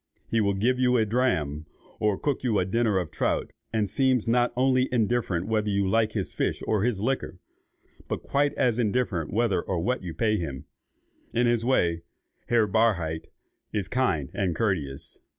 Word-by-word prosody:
He 115 - +3
will 100 -1 +1
give 125 +6 +1
you 125 -1 +3
a 110 - +3
dram, 80 - 0 0.3
or 105 -2 +1
cook 145 -3 -1
you 115 -5 +1
a 90 - +2
dinner 110 +1 +1
of 90 -5 -2
trout, - - -1 0.2
and 110 -2 0
seems 130 +2 +1
not 120 +1 +3
only 130 0 +2
indifferent 110 -7 0
whether 110 -1 0
you 100 -1 +1
like 110 +2 +2
his 100 -4 -3
fish - - -1
or 105 -3 +1
his 110 -3 0
liquor, 115 -8 -2 0.7
but - - -4
quite 145 +1 +1
as 120 -1 +1
indifferent 105 -8 0
whether 110 -2 +1
and 90 -2 -1
what 125 +3 0
you 85 -3 -6
pay 110 -2 +1
him. 70 -8 -5 0.7
In 120 +1 +3
his 120 -1 +2
way, 85 -10 +2 0.5
Herr 115 -2 +3
Barhydt 95 -7 +1 0.5
is 100 -4 -1
kind 95 - 0
and 95 -4 -1
courteous. 80 -12 -1
110 Hz, 175 wpm, -26 LUFS, 95-120 Hz, 0.7 s, He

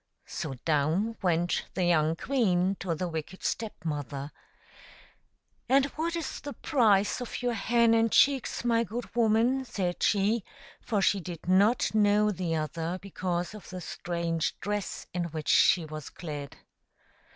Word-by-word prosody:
'' - - -46
So 135 - -5
down 165 +9 +1
went 175 -1 +1
the 185 - 0
young 160 -2 +3
queen 190 -6 +1
to 175 -4 -2
the 180 +3 -2
wicked 165 +2 -6
Step 220 -6 -3
mother; 145 -2 -4 0.7
" - - -32
And 270 +1 +5
what 330 +2 -1
is 335 - -4
the 290 -1 -6
price 220 -7 +2
of 245 0 -5
your 245 -1 +1
hen 230 +2 +3
and 225 -1 +3
chicks, 270 -3 +3
my 230 -1 +3
good 235 +4 -6
woman," 235 +3 +3
said 185 -8 -3
she, 210 +2 +2 0.4
for 205 -4 0
she 200 - +3
did 175 -2 -8
not 200 +7 +3
know 210 0 +4
the 175 -4 -2
other, 160 +3 -2
because 180 -2 -3
of 210 - -11
the 185 - -6
strange 170 -1 -3
dress 205 -2 -3
in 175 -1 -1
which 155 -2 -5
she 170 -3 +5
was 155 -2 -7
clad. 145 -5 -7
190 Hz, 155 wpm, -29 LUFS, 170-230 Hz, 0.7 s, And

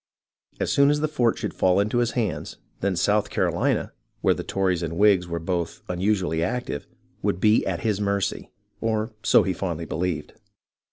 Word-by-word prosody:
As - - 0
soon 140 0 +5
as 150 0 +2
the 155 - +2
fort 125 -7 +1
should - - -3
fall 95 +1 +3
into 105 +4 +1
his 120 -1 +1
hands, 115 -4 -2 0.2
then 100 -1 0
South 105 +4 +2
Carolina, - - 0 0.3
where - - +4
the - - -5
Tories 95 -3 0
and 85 0 -3
Whigs 100 -3 +4
were 85 0 -3
both 85 0 -3
unusually 90 -2 0
active, 95 -4 -2 0.4
Avould 85 - 0
be 105 +2 +4
at 90 -2 -2
his 105 -2 0
mercy, 100 -1 -1 0.3
or 110 0 0
so - - +5
he 95 - 0
fondly 85 -3 -3
believed. 80 -1 -3
95 Hz, 175 wpm, -24 LUFS, 85-110 Hz, 0.4 s, soon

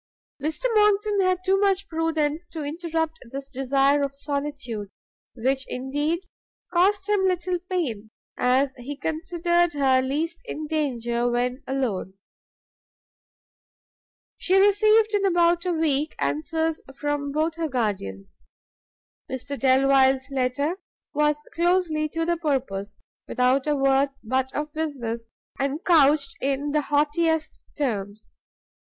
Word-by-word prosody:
Mr 310 - -3
Monckton 420 -1 +3
had 370 -1 +1
too 385 +1 +3
much 395 -1 +1
prudence 320 0 -1
to 325 -3 -6
interrupt 320 +1 -2
this 275 +2 -6
desire 275 +1 +2
of 275 -1 -2
solitude, 280 -7 -4 0.5
which 265 +3 0
indeed 290 +7 -2 0.5
cost 385 +3 +3
him 410 -2 +2
little 360 0 0
pain, 240 - -2 0.3
as 260 +2 +2
he 275 +4 -6
considered 345 +2 0
her 265 -3 +3
least 310 +6 -2
in 310 - -5
danger 245 -6 -1
when 250 +2 -1
alone. 230 -8 -2 2.2
She 370 - +1
received 425 +2 +4
in 410 -1 +2
about 345 -2 +3
a - - +2
week 310 -2 0
answers 305 - -1 0.2
from 290 -1 -2
both 310 +3 0
her 325 -2 -2
guardians. 190 - -3 0.9
Mr 260 +2 -4
Delvile's 265 0 +3
letter 275 +7 -1 0.3
was 300 0 +1
closely 340 -3 +1
to 330 +2 -2
the 345 0 +1
purpose, 225 -10 -2 0.3
without 255 +3 +2
a 300 - +2
word 275 0 +3
but 260 +3 0
of 300 0 -3
business, 240 -8 -3 0.3
and 275 +4 -2
couched 295 -4 +4
in 280 +2 -1
the 300 0 +2
haughtiest 305 +2 0 0.2
terms. 215 -6 -3
290 Hz, 120 wpm, -25 LUFS, 265-335 Hz, 2.2 s, received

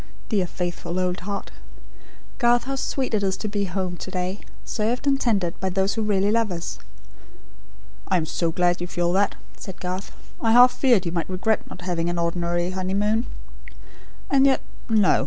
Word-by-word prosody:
Dear 195 -5 +1
faithful 175 0 -3
old 180 -1 0
heart! 200 +2 -5 0.9
Garth, 240 -1 +4
how 275 - -3
sweet 265 -1 -2
it 215 - +2
is 190 -1 0
to 215 - -4
be 200 -1 -1
at 180 - -9
home 185 -2 -2
to - - -7
day; 185 +1 -2 0.3
served 230 +5 -1
and 275 -1 +2
tended 195 -8 +1
by 190 - -1
those 190 +1 +1
who 225 - -2
really 205 -1 +2
love 225 -2 +2
us." 170 -1 -4 1.3
"I 185 - +3
am 165 - 0
so 165 +1 -1
glad 175 +1 +1
you 175 - -2
feel 175 0 0
that," 200 +2 +2 0.2
said 190 -2 -8
Garth. 185 +2 -4 0.3
"I 225 -1 +3
half 245 +1 +8
feared 240 -10 +3
you 170 - -1
might 170 0 -2
regret 205 +4 0
not 180 - -9
having 175 -2 -1
an 175 - -2
ordinary 175 +1 0
honeymoon 200 +5 0 1.0
And 275 0 +5
yet, 270 - +3 0.3
no! 215 -4 +4
190 Hz, 185 wpm, -24 LUFS, 180-220 Hz, 1.3 s, half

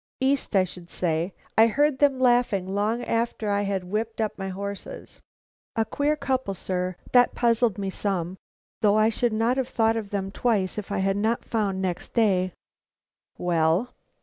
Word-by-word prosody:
"East, 265 -4 +1
I 190 - +6
should 180 -1 -9
say. 170 +1 -1 0.2
I 225 +1 +7
heard 285 +4 +2
them 280 -3 +3
laughing 240 -7 +2
long 215 +4 0
after 230 -3 -1
I 200 0 +1
had 195 -2 -1
whipped 220 +5 -3
up 220 -1 -1
my 195 -1 -5
horses. 200 +1 -7 0.5
A 225 -1 +1
queer 290 +5 0
couple, 260 -8 -1
sir, 180 0 -2 0.2
that 245 -1 +5
puzzled 235 -3 +2
me 195 -1 -3
some, 185 -2 -2 0.4
though 210 -1 +4
I 215 +1 +4
should 235 +1 0
not 225 +4 +1
have 260 -1 -1
thought 225 0 +2
of 220 -3 -4
them 195 -1 -3
twice 210 -3 0
if 205 0 -8
I 200 - 0
had 195 0 +1
not 220 +3 0
found 200 -4 -1
next 180 -2 -4
day 190 -5 +3 0.4
" - - -68
"Well?" 175 +6 +1
210 Hz, 175 wpm, -25 LUFS, 190-235 Hz, 0.5 s, I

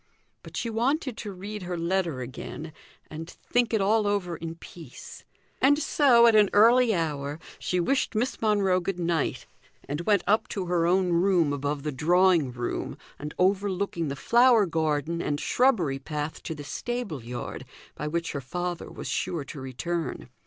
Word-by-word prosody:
But - - -9
she - - -2
wanted 260 +3 0
to 210 - -5
read 200 +3 -7
her 180 -1 -4
letter 170 -5 -1
again, 150 +5 -7 0.4
and 160 +2 -7
think 240 +4 -1
it 220 -3 +2
all 210 +2 +3
over 195 -4 -1
in 165 0 -6
peace; 165 -5 -12 0.4
and 285 +2 +5
so, 275 -5 +5
at 230 - +6
an 210 -2 +5
early 235 +3 +6
hour, 150 -3 -2 0.2
she 180 - -1
wished 260 +6 0
Miss 245 +5 -1
Monro 200 -4 +3
good 185 +1 -3
night, 170 -3 -1 0.4
and 145 +3 -3
went 200 +1 +2
up 210 +4 +3
into 190 -3 -4
her 175 -1 +1
own 180 0 +2
room 170 -4 +3
above 145 0 -2
the 150 - -2
drawing 170 0 +3
room, 120 0 -4 0.2
and 150 +1 -6
overlooking 190 -2 0
the 140 - -3
flower 235 - +5
garden 160 -1 -1
and 145 -3 -1
shrubbery 185 - +2
path 150 +2 -5
to 160 - -5
the 145 - -8
stable 220 - -4
yard, 120 0 -6 0.3
by 150 - -5
which 165 +2 -2
her 140 - -4
father 175 +5 -4
was - - -8
sure 165 -5 -2
to 140 0 -9
return. 145 +2 -4
175 Hz, 170 wpm, -27 LUFS, 150-210 Hz, 0.4 s, at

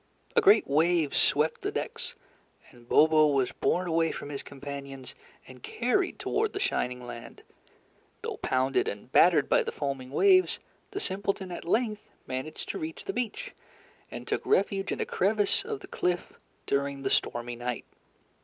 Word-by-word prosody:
A 470 - +6
great 410 0 +6
wave 160 +1 +2
swept 150 +2 +2
the - - -2
decks, - - -4 0.6
and 120 -1 -19
Bobo 155 0 +6
was 135 -3 +1
borne 180 0 0
away 165 -1 +2
from - - -7
his 140 -1 -4
companions 140 -2 -8 0.3
and 130 -1 -13
carried 250 - 0
toward 435 0 -1
the 395 - -3
shining 125 - -1
land. 120 -1 -9 0.8
Though - - -4
pounded 130 +1 +1
and 105 +5 -6
battered 165 -3 +5
by - - +4
the - - -3
foaming 135 -3 -4
waves, 370 - +4 0.3
the 400 -1 -4
simpleton 195 - -2
at 175 - -6
length 215 +3 +1 0.2
managed 130 +4 -5
to - - -3
reach 155 0 -6
the 390 - -4
beach, 385 - -3 0.6
and - - -8
took - - -1
refuge 195 0 +1
in - - -2
a - - 0
crevice 205 +1 +1
of 135 - -5
the - - -10
cliff 180 0 -1 0.3
during 140 0 -1
the 135 - -1
stormy 120 0 0
night. 120 0 -4
155 Hz, 165 wpm, -28 LUFS, 135-200 Hz, 0.8 s, A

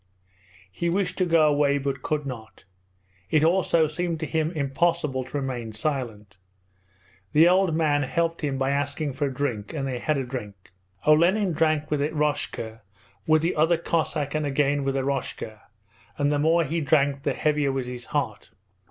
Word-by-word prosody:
He 170 - -2
wished 190 +2 0
to 185 - +2
go 165 -2 +5
away 145 -1 +3
but 135 -1 -3
could 150 0 -2
not. 115 -5 -8 0.7
It 155 -1 +3
also 170 -1 +3
seemed 165 +2 -2
to - - -1
him 160 0 0
impossible 150 -1 0
to 130 - -5
remain 125 -5 -4
silent. 105 -7 -4 1.0
The 160 +3 +7
old 180 -2 +3
man 150 -3 +2
helped 165 +4 -1
him 140 -3 -1
by 135 0 0
asking 145 +1 -1
for 140 +2 -1
a - - -3
drink, 125 -5 -3
and 135 -3 -2
they 125 -2 -3
had 155 +3 0
a 135 - -1
drink. 105 -7 -8 0.3
Olenin 175 +5 +4
drank 155 -1 +1
with 150 -2 +1
Eroshka, 145 -7 -2 0.5
with 155 0 +4
the 170 - 0
other 160 +2 +3
Cossack, 155 -3 -1
and 155 -1 -1
again 140 0 +1
with 135 0 -1
Eroshka, 130 -5 -3 0.6
and 145 0 +1
the 145 - +1
more 165 +3 +3
he 165 +3 -2
drank 140 -1 +2
the - - 0
heavier 150 -2 +1
was 135 -1 -2
his 125 -1 -7
heart. - - -3
145 Hz, 170 wpm, -25 LUFS, 135-160 Hz, 1.0 s, The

